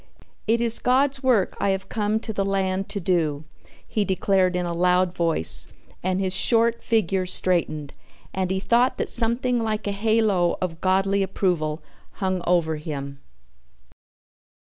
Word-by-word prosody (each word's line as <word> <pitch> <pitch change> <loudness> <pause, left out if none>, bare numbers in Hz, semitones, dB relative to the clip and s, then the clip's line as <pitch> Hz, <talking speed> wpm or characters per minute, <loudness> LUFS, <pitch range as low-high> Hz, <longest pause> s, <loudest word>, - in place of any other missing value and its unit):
"It 230 +2 +2
is 230 -1 +1
God's 265 +2 +2
work 245 -8 +2
I 200 - +1
have 190 0 -2
come 215 +1 -1
to 220 - -5
the 200 - -1
land 195 -1 -1
to 200 - -3
do," 165 -5 0 0.4
he 215 - 0
declared 190 -1 +1
in 180 0 -1
a 170 - -3
loud 180 +1 +2
voice 165 - 0 0.3
and 185 +1 -1
his 190 -1 -1
short 230 +3 +2
figure 190 -4 0
straightened 170 -6 +2 0.4
and 185 -1 -1
he 190 0 -1
thought 240 +5 +2
that - - -2
something 240 +1 0
like 215 -1 -2
a 205 - -1
halo 205 -4 +1
of 165 -3 -4
Godly 195 +1 +2
approval 175 -5 -1 0.3
hung 185 -2 -2
over 165 -3 +1
him. 140 -3 -6
190 Hz, 150 wpm, -23 LUFS, 175-220 Hz, 0.4 s, It